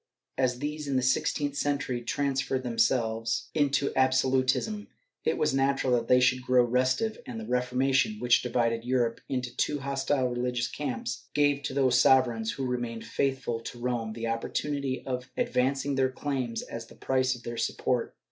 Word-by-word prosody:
As 130 -2 +1
these, 150 +2 -4
in 140 - -1
the 130 - +2
sixteenth 140 +2 +1
century, 140 -4 -1
transformed 135 -1 -1
themselves 115 -2 0
into 140 -2 +1
absolutism, 130 - +2 0.4
it - - +1
was 150 - +1
natural 135 -1 +2
that 115 -1 +1
they 125 - +6
should 130 0 +3
grow 125 0 +4
restive, 130 - +1
and 115 -2 -5
the 110 - -6
Reformation, 130 - +1
which 120 -9 +3
divided 115 -2 0
Europe 120 -2 0
into 125 -2 -3
two 145 -1 0
hostile 135 -1 0
religious 120 0 -1
camps, 130 -2 -4
gave 145 -1 +3
to 130 -1 -4
those 130 -3 +4
sovereigns 120 -4 +3
who 135 - -3
remained 120 -2 -3
faithful 130 -4 -1
to 120 - -8
Rome 120 -2 -2
the 115 +1 -5
opportunity 130 +4 -2
of 125 -1 -4
advancing 140 - +1
their 135 -1 +2
claims 130 -3 -3
as 115 0 -7
the - - -15
price 130 -1 +1
of 120 - -13
their 120 0 -5
support. - - -1
130 Hz, 165 wpm, -28 LUFS, 120-140 Hz, 0.4 s, they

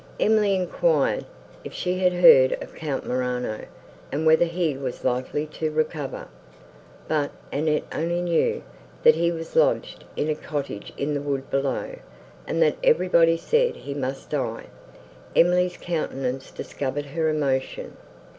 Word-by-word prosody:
Emily 210 -2 +3
enquired, 190 - +1 0.4
if - - -8
she 180 0 -2
had 180 -1 +3
heard 135 -7 +7
of - - -7
Count 150 -4 -4
Morano, 125 -3 -2 0.5
and 155 +3 -1
whether 160 +2 +6
he 170 -3 -1
was 130 -2 -5
likely 130 +4 -1
to 155 +1 -3
recover: 155 -2 -3 0.8
but 150 -2 0 0.2
Annette 150 +1 +1
only 170 +2 -1
knew, 175 -2 +1 0.4
that - - +8
he 170 +1 +1
was 165 -1 -6
lodged - - +2
in 150 - -1
a 155 - +1
cottage 145 -8 -5
in 145 +2 -1
the 145 - -1
wood 140 -2 -3
below, 140 - -1 0.5
and - - +2
that 480 - +2
everybody 170 - +4
said 475 - +1
he 140 - -7
must 135 -1 -4
die. - - -2 0.7
Emily's 180 +1 +3
countenance 135 -6 -3
discovered 145 +1 -4
her 160 +3 -1
emotion. 140 -4 -1
155 Hz, 140 wpm, -24 LUFS, 135-175 Hz, 0.8 s, that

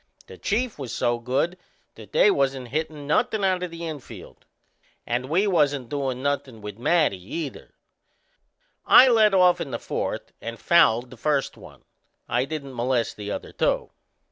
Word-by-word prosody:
The - - -13
Chief 225 -2 -1
was 130 -4 -5
so 120 0 0
good 130 +9 -1 0.4
that - - -14
they 475 -3 +5
wasn't 135 - -1
hittin' 155 0 -3
nothin' 210 +7 +1
out 185 -2 +1
o' 180 - -2
the 170 0 -8
infield. 155 -5 -9 0.6
And 125 +2 -2
we 180 +6 +2
wasn't 145 - +1
doin' 135 -3 -3
nothin' 140 -5 -2
with 105 0 -8
Matty, 145 - +2
either. 160 -5 -6 1.1
I 260 - +8
led 215 -4 +4
off 180 -2 +4
in 155 - -4
the 120 - -3
fourth - - -4
and 115 0 -6
fouled 125 -8 +3
the 130 - -12
first 145 +3 0
one. - - -15 0.4
I 125 +3 +1
didn't 140 -2 -6
molest 120 0 0
the 105 -1 -7
other - - -5
two. - - 0
145 Hz, 165 wpm, -24 LUFS, 125-175 Hz, 1.1 s, I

